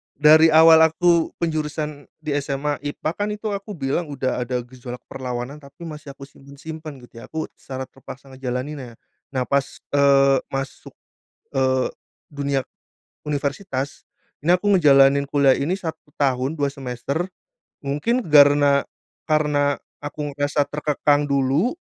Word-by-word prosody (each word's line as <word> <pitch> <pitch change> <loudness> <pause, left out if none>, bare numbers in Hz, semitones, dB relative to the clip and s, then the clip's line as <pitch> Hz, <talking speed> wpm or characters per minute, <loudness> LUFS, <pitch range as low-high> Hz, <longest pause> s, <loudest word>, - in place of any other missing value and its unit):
Dari 155 +2 +6
awal 160 0 +8
aku 170 +1 +2
penjurusan 150 -2 -3 0.2
di 145 -2 -1
SMA, 145 +1 -2
IPA, 150 +2 -2
kan 205 +1 -1
itu 210 +1 -4
aku 200 +1 -5
bilang 145 +2 -2
udah 130 -3 -2
ada 125 0 -2
gejolak 125 0 -9
perlawanan 125 +2 -5
tapi 140 +2 -17
masih 150 -2 -9
aku 140 - -23
simpen-simpen 145 0 -10
gitu 120 -1 -16
ya - - -9
aku 160 0 -5
secara 130 -1 -7
terpaksa 135 +1 -12
ngejalaninnya, 130 0 -5 0.4
nah 130 - 0
pas, 140 +2 -1
eee, 140 -1 +4 0.2
masuk, 135 0 -5 0.6
eee, 130 -1 +1 0.4
dunia, 140 -2 -1 0.7
universitas, 140 -1 -3 0.3
ini 155 - -5
aku 205 +3 +1
ngejalanin 140 -5 +5
kuliah 140 -2 +4
ini 160 +9 0
1 160 -5 -7
tahun 135 +2 0
2 140 -1 0
semester, 135 +6 -4 0.5
mungkin 150 - 0
karena 145 -1 +6 0.4
karena 150 -2 +1 0.2
aku 145 0 -4
merasa 145 +1 0
terkekang 145 0 +1
dulu, 140 - +1
145 Hz, 130 wpm, -22 LUFS, 135-155 Hz, 0.7 s, awal